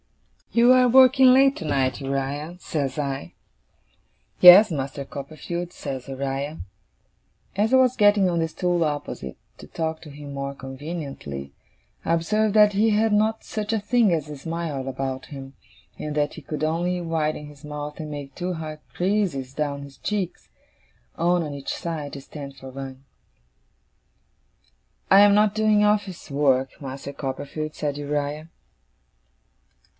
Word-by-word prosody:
'You 240 +2 +6
are 255 -1 +5
working 260 +1 +7
late 270 +2 +5
tonight, 140 -5 -1
Uriah,' 140 +5 -3
says 140 -6 -3
I. 135 - -3 1.1
'Yes, 185 +4 +10
Master 140 -1 -4
Copperfield,' 160 +6 -6
says 135 -2 -6
Uriah. 135 +3 -3 1.0
As 210 +4 +1
I - - +8
was 255 -1 +4
getting 205 -3 +4
on 170 -2 0
the 165 - +1
stool 175 0 0
opposite, 145 - -4 0.2
to - - -11
talk 160 -1 -3
to 160 - -11
him 145 0 -9
more 140 0 -4
conveniently, 135 - -7 0.5
I 165 - +2
observed 210 +5 +1
that 210 -1 +6
he 215 +3 +3
had 215 0 +2
not 220 +1 +1
such 215 0 -3
a 220 - +1
thing 215 0 +2
as 155 -3 0
a 150 - -7
smile 155 -3 -4
about 130 0 -4
him, 135 -2 -9 0.5
and 150 0 -4
that 145 -1 0
he - - -9
could 150 -1 -5
only 175 +3 0
widen 155 -3 -2
his 145 -2 -14
mouth 150 0 -6
and 155 -1 -6
make 140 -2 -7
two 180 +1 -3
hard 155 -1 -6 0.2
creases 175 -9 0
down 140 -1 -3
his 135 -2 -13
cheeks, 200 -4 -3 0.7
one 175 0 +2
on 150 -2 -5
each 140 -1 -4
side, 160 -5 -4
to 140 - -7
stand 140 -1 -9
for 135 - -10
one. 135 0 -8 2.1
'I 195 +1 +9
am 205 0 +7
not 210 0 +3
doing 215 -1 +3
office 205 -5 0
work, 135 -2 +1
Master 140 +1 -7
Copperfield,' 145 +3 -5
said 145 -1 -2
Uriah. 145 +2 -3
155 Hz, 150 wpm, -24 LUFS, 140-195 Hz, 2.1 s, Yes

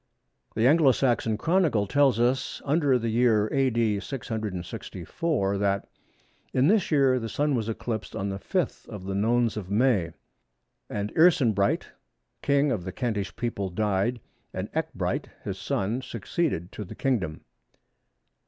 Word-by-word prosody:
The 110 - +2
Anglo 145 -1 +6
Saxon 120 -4 +1
Chronicle 160 - +2
tells 135 0 +3
us 125 +2 +1
under 145 -3 +3
the 115 -1 -2
year 110 -3 +3
A.D. 115 -6 +2
664 105 - -3
that, 100 -1 0 0.7
"In 130 - +4
this 200 0 +3
year 135 -4 +3
the 115 -1 -5
Sun 145 +5 0
was 115 -3 -1
eclipsed 110 -1 -4
on 100 +1 -2
the 95 0 -4
5th 180 - -2
of 105 -4 -7
the 95 - -3
Nones 115 +3 +1
of 95 -3 -5
May; 105 -5 +2 0.8
and 105 0 -3
Earcenbryht, 120 - +3 0.5
King 140 0 +2
of 105 -8 -1
the 95 - -5
Kentish 110 -3 -3
people 100 -5 -2
died 105 +4 0 0.4
and - - -4
Ecgbryht - - -2 0.2
his - - -5
son 110 +7 -1
succeeded 115 - -2
to 105 - -6
the 90 - -10
Kingdom." 100 -13 -1
115 Hz, 140 wpm, -26 LUFS, 100-135 Hz, 0.8 s, Anglo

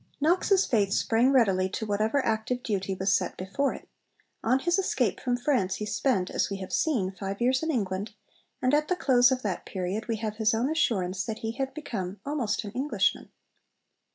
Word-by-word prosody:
Knox's 365 +5 +3
faith 205 -6 +1
sprang 235 +5 +3
readily 195 -8 +3
to 220 - -4
whatever 215 +6 0
active 225 +3 -1
duty 195 -3 -2
was 190 +1 +1
set - - 0
before 205 +10 -1
it. - - -12 0.6
On 250 +3 +3
his 345 +7 +1
escape 385 - 0
from 245 -1 0
France 240 -8 +1
he 210 - -4
spent, 210 -4 0
as - - 0
we 200 - -3
have 190 -1 -7
seen, 225 -13 +1
five 195 0 -5
years 255 +2 +2
in 320 - -2
England, 205 -5 -2 0.5
and 255 +2 +2
at 300 +1 +3
the 365 - +1
close 250 -6 +4
of 255 -1 -1
that 195 -5 -2
period 190 +3 -4
we 230 - 0
have 215 -1 -4
his 220 0 +2
own 245 +6 0
assurance 190 - 0
that 220 0 -4
he 225 - -1
had 270 +2 -4
become 205 - -5
almost 265 -8 -1
an 205 - -6
Englishman. 245 -4 0
225 Hz, 195 wpm, -27 LUFS, 195-265 Hz, 0.6 s, close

